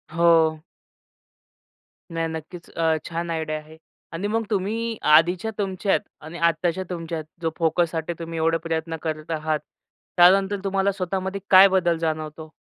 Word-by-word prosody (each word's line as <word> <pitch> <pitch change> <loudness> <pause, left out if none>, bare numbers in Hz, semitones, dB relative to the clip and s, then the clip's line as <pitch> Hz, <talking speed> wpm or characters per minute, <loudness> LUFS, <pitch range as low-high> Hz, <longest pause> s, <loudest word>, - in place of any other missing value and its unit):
हो. 165 -2 +4 1.5
नाही 165 0 -1
नक्कीच, 160 +2 -8
अ, 165 -1 +1
छान 170 +1 -4
आयडिया 160 -1 -2
आहे 155 +1 -15 0.4
आणि 175 +5 -2
मग 225 +2 0
तुम्ही 225 +3 -1
अ, - - -3
आधीच्या 170 +7 +4
तुमच्यात 195 -3 0 0.2
आणि 160 +3 -9
आत्ताच्या 175 +2 -1
तुमच्यात 165 -2 -4 0.2
जो 165 -1 -1
फोकससाठी 165 0 0
तुम्ही 165 0 -6
एवढे 165 +1 +2
प्रयत्न 165 0 -2
करत 155 0 -4
आहात, 155 -1 -1 0.6
त्यानंतर 195 +3 +5
तुम्हाला 195 0 +1
स्वतः 190 -1 -3
मध्ये 190 +1 -4
काय 190 +1 +9
बदल 180 -3 +2
जाणवतो? 155 -1 -4
165 Hz, 145 wpm, -23 LUFS, 160-190 Hz, 1.5 s, काय